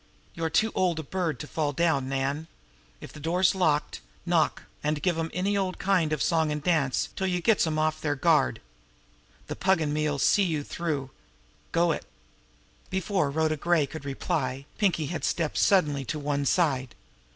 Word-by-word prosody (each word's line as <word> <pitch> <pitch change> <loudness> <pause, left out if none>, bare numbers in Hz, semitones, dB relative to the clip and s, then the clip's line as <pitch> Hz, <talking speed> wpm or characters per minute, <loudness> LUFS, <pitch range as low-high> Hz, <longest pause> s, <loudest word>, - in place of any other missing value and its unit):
You're 165 -1 -2
too 220 +7 +2
old 180 -3 +1
a 160 - -3
bird 165 -3 -2
to - - -5
fall 150 -2 -1
down, 140 -4 +1
Nan. 135 +3 -2 0.5
If - - -10
the - - -10
door's 175 +4 +2
locked, 160 -6 0 0.2
knock - - +1 0.2
an' 150 +1 +1
give 165 +4 0
'em 165 0 -2
any 195 +3 0
old 190 -2 -1
kind 185 -5 +1
of 155 - -1
a - - +3
song 160 -2 +2
an' 150 - -1
dance 150 -5 +1
till 190 - -1
you 180 -1 0
gets 205 -1 +3
'em 155 -1 -1
off 155 0 0
their 145 -2 0
guard. 135 - +2 0.8
The - - -5
Pug 190 -2 +2
an' 150 -2 -1
me 155 0 +1
'll 145 - -2
see 145 +8 +3
you 160 -6 0
through. 145 -5 -3 0.6
Go 170 0 +3
it!" - - -4 0.8
Before 190 -4 0
Rhoda 155 +1 0
Gray 170 -1 +2
could 150 +2 -8
reply, 135 -1 -2
Pinkie 180 -6 +2
had 170 - -4
stepped 160 -3 0
suddenly 150 -8 +3
to 155 - -3
one 145 -1 -1
side. 135 -8 +1
160 Hz, 185 wpm, -27 LUFS, 145-175 Hz, 0.8 s, a